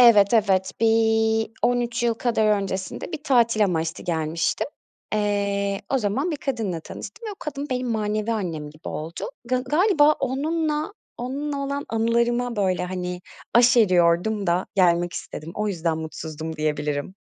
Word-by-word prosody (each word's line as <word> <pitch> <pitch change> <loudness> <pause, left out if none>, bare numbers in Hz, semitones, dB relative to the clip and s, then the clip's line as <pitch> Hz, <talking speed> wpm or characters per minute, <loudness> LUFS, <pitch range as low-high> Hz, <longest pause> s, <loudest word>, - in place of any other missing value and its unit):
Evet 225 -3 +7
evet. 190 -3 +3
Bir 225 0 +3
13 240 -1 +1
yıl 235 -1 +2
kadar 230 -2 +1 0.2
öncesinde 190 - -4
bir 305 - -5
tatil 230 -5 +4
amaçlı 165 -3 -2
gelmiştim. 165 -1 0 0.5
Eee, 200 -1 0
o 270 - +3
zaman 255 - 0
bir 305 - -2
kadınla 225 - -2
tanıştım 225 - -8
ve - - -4
o - - -8
kadın 290 -1 -5
benim 250 -1 -1
manevi 215 0 0
annem 165 -9 -3
gibi 155 +1 -10
oldu. 160 +3 -5
Ga 255 +1 +1
galiba 300 +3 +4
onunla, 305 +5 -1 0.3
onunla 280 +4 -3
olan 280 +1 -3
anılarıma 235 +1 +1
böyle 185 -3 +1
hani 180 -1 -4 0.3
aşeriyordum 205 -4 +4
da 175 +2 +1
gelmek 175 -2 +3
istedim, 155 +2 -7
o 210 0 -1
yüzden 165 -4 -1
mutsuzdum 160 0 -6
diyebilirim. 150 +2 -2
215 Hz, 140 wpm, -24 LUFS, 180-245 Hz, 0.5 s, Evet